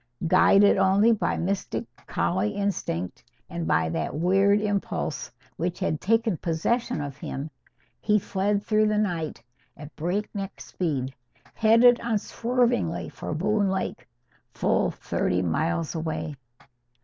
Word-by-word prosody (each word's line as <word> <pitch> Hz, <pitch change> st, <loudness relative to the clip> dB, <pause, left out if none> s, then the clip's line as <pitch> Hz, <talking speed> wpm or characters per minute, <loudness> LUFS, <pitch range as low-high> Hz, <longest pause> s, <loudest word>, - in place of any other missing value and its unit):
Guided 195 Hz, +4 st, +5 dB
only 195 Hz, +4 st, +4 dB
by 220 Hz, -, 0 dB
mystic 170 Hz, -, -2 dB, 0.2 s
collie 200 Hz, +4 st, 0 dB
instinct 180 Hz, -, -2 dB, 0.3 s
and 170 Hz, -1 st, -3 dB
by 80 Hz, 0 st, +2 dB
that 80 Hz, -, -2 dB
weird 195 Hz, +5 st, +3 dB
impulse 205 Hz, -5 st, -2 dB, 0.3 s
which 175 Hz, +2 st, -2 dB
had 155 Hz, -, -1 dB
taken 225 Hz, -2 st, +2 dB
possession 230 Hz, +9 st, -1 dB
of 140 Hz, -1 st, -6 dB
him, 145 Hz, +2 st, -5 dB, 0.5 s
he 210 Hz, -1 st, +3 dB
fled 200 Hz, +1 st, 0 dB
through 215 Hz, 0 st, +3 dB
the 210 Hz, 0 st, +1 dB
night 170 Hz, -, -2 dB, 0.3 s
at 150 Hz, +1 st, -11 dB
breakneck 195 Hz, +3 st, -3 dB
speed, 135 Hz, -7 st, -3 dB, 0.4 s
headed 230 Hz, +2 st, +5 dB
unswervingly 225 Hz, -, 0 dB
for -, -, -5 dB
Boone 205 Hz, +4 st, +1 dB
Lake, 190 Hz, 0 st, -3 dB, 0.5 s
full -, -, +2 dB
thirty 90 Hz, +1 st, -1 dB
miles 160 Hz, -, -1 dB
away. 160 Hz, -2 st, -3 dB
190 Hz, 120 wpm, -26 LUFS, 155-210 Hz, 0.5 s, Guided